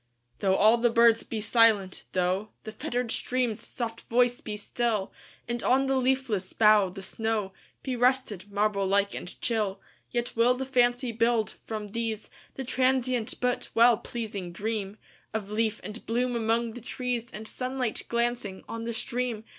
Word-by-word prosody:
Though 190 -1 +3
all 220 +4 +5
the 240 +1 +4
birds 230 0 +5
be 220 -2 -4
silent,—thoughThe 205 -2 +1
fettered 240 +1 -2
stream's 245 -4 -1
soft 230 -2 -5
voice 245 +3 +3
be 215 -7 -5
still, 215 -1 -1 0.3
And 240 0 -2
on 265 +2 +3
the 270 0 +1
leafless 255 -7 0
bough 210 -3 +5
the 195 +2 -9
snowBe 220 +4 -4
rested, 245 -6 +1
marble 200 -1 +1
like 200 +1 +2
and 180 - -7
chill,—Yet 230 +2 -3
will 235 +2 +4
the 265 +1 -3
fancy 245 -1 +2
build, 230 -1 +1
from 215 -2 -4
these, 225 0 -3 0.2
The 265 - -4
transient 255 -2 +1
but 250 0 -1
well 230 -1 +6
pleasing 205 -6 -5
dreamOf 210 +2 -3 0.5
leaf 220 +1 0
and 210 +3 -7
bloom 245 +2 0
among 230 0 +1
the 245 - -8
trees, 245 0 -3
And 215 +1 -7
sunlight 255 -2 -2
glancing 235 -5 -1
on 230 0 -5
the 235 - -2
stream. 235 -1 -2
230 Hz, 145 wpm, -28 LUFS, 210-245 Hz, 0.5 s, well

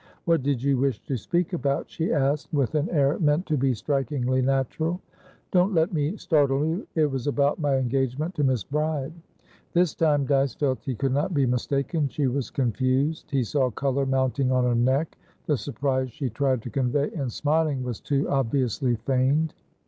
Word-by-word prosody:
"What 165 -3 +3
did 135 -2 -1
you 140 -2 +2
wish 135 -4 0
to 140 - -3
speak 175 - -1
about?" 140 -5 -1
she 165 0 -2
asked, 145 +1 0
with 140 -4 0
an 155 +2 0
air 145 -2 +2
meant 150 +3 +2
to 155 - 0
be 135 -2 +1
strikingly 130 +1 0
natural. 135 +6 0 0.5
"Don't 185 +2 +3
let 165 +4 +2
me 155 +5 -1
startle 145 -6 +2
you; 165 +6 -2
it 155 -2 +4
was 135 -2 -3
about 145 +1 +1
my 145 -3 +1
engagement 135 +5 -1
to 150 - -1
Miss 130 -6 +1
Bride." 150 - -2 0.6
This 175 -2 +3
time, 150 -4 +2
Dyce 135 -2 +1
felt 135 -3 0
he 130 - -3
could 135 +2 -1
not 150 +5 0
be 140 -2 +3
mistaken. 140 +4 0
She 140 +2 -2
was 130 0 -1
confused; 130 +5 0
he 135 -4 +1
saw 130 +2 +1
colour 135 +3 -1
mounting 130 0 +1
on 130 -1 +2
her 125 -1 +2
neck; 130 +6 +1 0.3
the 150 - +2
surprise 130 -1 -2
she 130 +1 -4
tried 130 -1 0
to 120 - -6
convey 140 +2 0
in 140 -6 -2
smiling 150 +1 0
was 125 -3 -4
too 140 -1 -1
obviously 125 -2 0
feigned. 135 +6 +1
140 Hz, 185 wpm, -25 LUFS, 130-150 Hz, 0.6 s, it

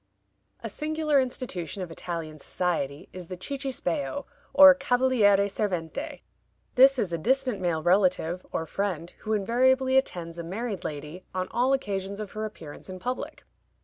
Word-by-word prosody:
A - - -2
singular 305 +4 +1
institution 200 - -4
of 175 - -8
Italian 165 -2 -5
society 155 -4 -2
is 180 -2 -8
the 185 - -6
Cicisbeo, 280 - -3 0.3
or 285 -1 +10
Cavaliere 245 -7 +3
Servente. 185 -5 -3 0.5
This 270 +2 +7
is 185 -8 -1
a 165 - -1
distant 255 - +1
male 165 -3 0
relative, 180 -1 +2
or 165 - -2
friend, 175 -2 -3
who 220 - -2
invariably 260 +5 +3
attends 170 -9 -1
a - - -4
married 200 +3 -4
lady 150 +4 -6
on 185 0 -1
all 250 +2 +2
occasions 200 -6 -2
of 210 -2 -6
her 215 0 -4
appearance 165 -5 -10
in 185 - -6
public. 250 +7 -5
200 Hz, 145 wpm, -27 LUFS, 175-255 Hz, 0.5 s, or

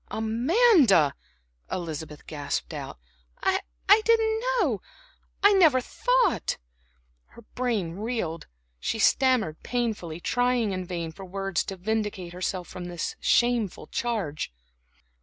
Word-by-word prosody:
"Amanda," 235 - +4 0.6
Elizabeth 160 -3 -5
gasped 145 -2 -4
out. - - -6 0.5
"I - - +2 0.3
I 440 - +7
didn't 445 -1 +3
know. 445 - 0 0.6
I 405 - +9
I - - +4
never 320 -9 +5
thought" - - +1 0.7
Her 235 - -16
brain 230 -9 -1
reeled, 195 -4 -3 0.3
she 225 - -2
stammered 225 - +2
painfully, 215 -10 -2
trying 245 +1 +1
in 185 -1 -3
vain 170 -2 -4
for 175 +5 -11
words 195 -1 -2
to 195 - -5
vindicate 200 -3 -2
herself 180 0 -3
from 180 - -7
this 175 -1 -4
shameful 240 -5 +1
charge. 200 - -3
220 Hz, 120 wpm, -26 LUFS, 175-255 Hz, 0.7 s, I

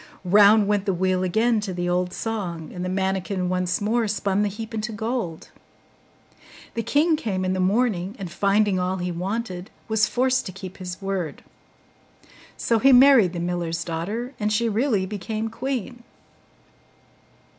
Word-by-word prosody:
Round 205 +2 +6
went 205 0 0
the 195 - +1
wheel 185 +1 +1
again 220 +5 +2
to 200 -3 -4
the 175 0 -2
old 180 0 0
song, 180 -8 -4
and 180 - -5
the 180 - -2
manikin 190 0 -1
once 180 0 0
more 225 +2 +1
spun 200 -1 0
the 210 - +1
heap 220 +3 -7
into 215 +1 -3
gold. 220 -6 -4 1.2
The 230 - -2
king 305 +8 +2
came 190 -9 -2
in 185 - 0
the 185 - -2
morning, 195 0 +1
and, 185 -4 -6
finding 200 0 +2
all 185 +1 -1
he 180 0 -3
wanted, 185 +1 -4 0.2
was 220 -1 +2
forced 260 +1 +1
to - - -5
keep 185 0 -9
his 180 -1 -6
word; 190 -6 -3 1.1
so 230 -1 +1
he 270 +5 +5
married 250 -8 +7
the 175 - -4
miller's 170 -1 -2
daughter, 205 +11 -4
and 210 -1 0
she 230 +2 +1
really 220 -3 +1
became 215 +3 -4
queen. 245 -1 -4
200 Hz, 160 wpm, -24 LUFS, 180-225 Hz, 1.2 s, married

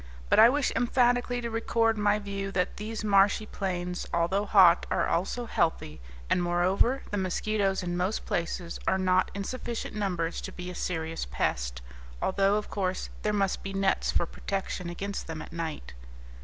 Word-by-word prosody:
But - - +6
I 230 - +9
wish 285 +1 +1
emphatically 245 0 +2
to 235 -1 -4
record 225 0 +1
my 210 0 +2
view 200 -1 -4
that 180 -1 -1
these 215 +1 -5
marshy 205 +1 +4
plains, 180 -3 -3
although 180 +4 +1
hot, 180 -4 +6
are - - +1
also 195 +8 -1
healthy; 160 - -1 0.3
and, 180 - +2
moreover, 185 +9 +2
the 205 - -1
mosquitoes, 195 +1 0
in 175 -1 -2
most 185 +4 -1
places, 170 0 -3
are 190 - +3
not 185 -1 +2
in 200 - -2
sufficient 235 0 -5
numbers 180 -5 -1
to - - -6
be 180 0 -7
a - - -7
serious 165 - -3
pest, - - -2 0.4
although 195 +1 +2
of 210 0 -2
course 185 -2 -2
there 210 - 0
must 200 -2 0
be 195 - -5
nets 195 0 +1
for - - +2
protection 190 0 -4
against 200 +3 -5
them 160 -1 -5
at 160 - -9
night. 160 - -5
195 Hz, 170 wpm, -28 LUFS, 175-210 Hz, 0.4 s, I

